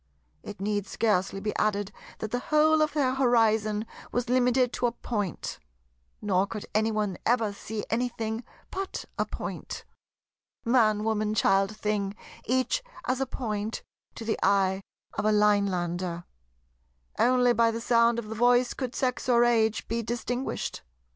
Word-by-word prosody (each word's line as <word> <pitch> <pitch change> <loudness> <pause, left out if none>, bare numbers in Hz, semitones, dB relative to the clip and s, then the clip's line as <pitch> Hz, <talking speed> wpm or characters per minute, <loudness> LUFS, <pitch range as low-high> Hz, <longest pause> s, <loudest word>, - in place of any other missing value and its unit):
It 205 - -9
need 205 0 -1
scarcely 195 -3 0
be 210 +1 -3
added 205 -1 0 0.3
that 220 - -5
the 245 - 0
whole 310 0 +5
of 305 -1 +2
their 270 -4 +2
horizon 220 -4 +2 0.3
was 245 -1 -1
limited 250 0 +3
to 245 - +1
a - - -1
Point; 210 -6 -4 0.6
nor 195 -1 +2
could 210 -1 -6
any 220 +1 +2
one 210 -4 -1
ever 225 -3 +2
see 210 +1 -5
anything 225 -1 -2 0.3
but 385 0 -4
a - - +1
Point. - - -6 0.8
Man, 220 -3 +3
woman, 215 -1 0
child, 195 +1 +2
thing—each 215 - -1 0.2
as 255 +1 0
a 270 - 0
Point 220 -4 -3 0.3
to 225 - -7
the 220 - -1
eye 195 -1 +3 0.4
of - - 0
a 215 - +4
Linelander. 185 -4 +1 1.0
Only 245 0 +4
by 230 -1 +4
the 230 0 -2
sound 235 0 +3
of 235 -2 -4
the 220 - -5
voice 245 +2 +3
could 255 -2 -4
sex 255 -1 -1
or 240 -1 +5
age 225 -2 +2
be 230 +1 -1
distinguished. 240 +3 -3
220 Hz, 145 wpm, -28 LUFS, 210-245 Hz, 1.0 s, whole